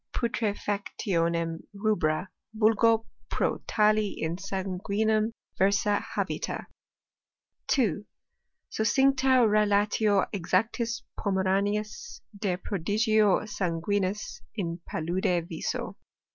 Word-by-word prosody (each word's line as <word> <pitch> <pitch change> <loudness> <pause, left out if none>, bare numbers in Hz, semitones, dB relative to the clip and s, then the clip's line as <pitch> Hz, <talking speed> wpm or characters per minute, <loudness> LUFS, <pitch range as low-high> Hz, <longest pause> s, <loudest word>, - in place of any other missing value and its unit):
265 215 -4 -1 0.2
putrtfactionem 170 -3 0 0.2
rubra, 195 -5 0 0.3
vulgo 225 +1 +4 0.2
pro - - 0
tali 215 0 +3
in 160 +1 -2
sanguinem 200 +3 -1 0.3
Tetfsahabita. 200 +1 0 1.0
2. 210 - +1 0.7
Succincta 260 +2 +4
relatio 210 -1 +3
exactis 225 +6 0 0.2
Pomeraniis 200 +2 -1 0.2
de 195 -3 -1
prodigio 210 +3 +2
sanguinis 195 +1 -2
in 170 -5 -3
palude 170 +1 0
viso. 165 - -4
205 Hz, 75 wpm, -28 LUFS, 185-215 Hz, 1.0 s, vulgo